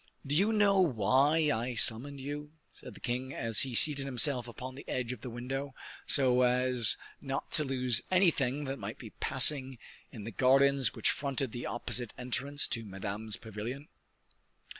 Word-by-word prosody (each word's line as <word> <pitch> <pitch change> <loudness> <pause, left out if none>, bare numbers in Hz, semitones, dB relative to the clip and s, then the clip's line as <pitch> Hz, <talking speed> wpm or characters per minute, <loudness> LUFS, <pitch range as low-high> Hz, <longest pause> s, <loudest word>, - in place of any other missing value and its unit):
"Do 140 - -2
you 200 +7 +3
know 205 -3 +3
why 145 - +2
I 120 +2 -3
summoned 125 +6 +3
you?" 145 +2 -7 0.2
said - - -12
the - - -12
king 130 +2 -4
as 115 -2 +2
he 130 -3 0
seated 145 +1 +7
himself 130 -1 +1
upon 130 +2 -8
the 135 - -11
edge 125 -2 -3
of 125 -4 -8
the 125 - -7
window, 130 +3 -6 0.3
so 125 -2 +2
as 125 -1 +3 0.2
not 135 -1 -5
to 155 - +1
lose 130 -4 +3
anything 150 -7 +1
that 135 0 -5
might - - -7
be - - -11
passing 135 -3 0 0.3
in 115 -6 -9
the 115 - -7
gardens 135 0 +2
which - - +1
fronted 135 -3 -3
the 120 - -6
opposite 120 -1 -4
entrance 135 +3 -2
to 115 - -2
Madame's 100 +2 -6
pavilion. 115 +7 -8
130 Hz, 165 wpm, -30 LUFS, 120-140 Hz, 0.3 s, seated